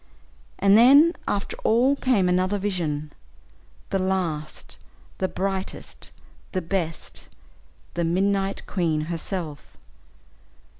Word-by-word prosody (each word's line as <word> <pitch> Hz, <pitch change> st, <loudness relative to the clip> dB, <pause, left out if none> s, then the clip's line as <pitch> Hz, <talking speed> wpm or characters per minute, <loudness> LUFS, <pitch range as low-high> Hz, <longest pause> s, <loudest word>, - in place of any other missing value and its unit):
And 200 Hz, 0 st, +5 dB
then 280 Hz, +9 st, +7 dB
after 200 Hz, -1 st, -2 dB
all 250 Hz, +5 st, +3 dB
came 245 Hz, -9 st, +2 dB
another 185 Hz, +3 st, +1 dB
vision, 160 Hz, -7 st, -2 dB, 0.8 s
"the 195 Hz, -, +1 dB
last, 180 Hz, -5 st, -3 dB, 0.4 s
the 190 Hz, -, +1 dB
brightest, 190 Hz, 0 st, -4 dB, 0.4 s
the 185 Hz, -, 0 dB
best 165 Hz, -2 st, -4 dB, 0.6 s
the 170 Hz, -, -1 dB
Midnight 195 Hz, +3 st, 0 dB
Queen," 165 Hz, -5 st, 0 dB
herself. 165 Hz, -1 st, -5 dB
190 Hz, 95 wpm, -24 LUFS, 165-200 Hz, 0.8 s, then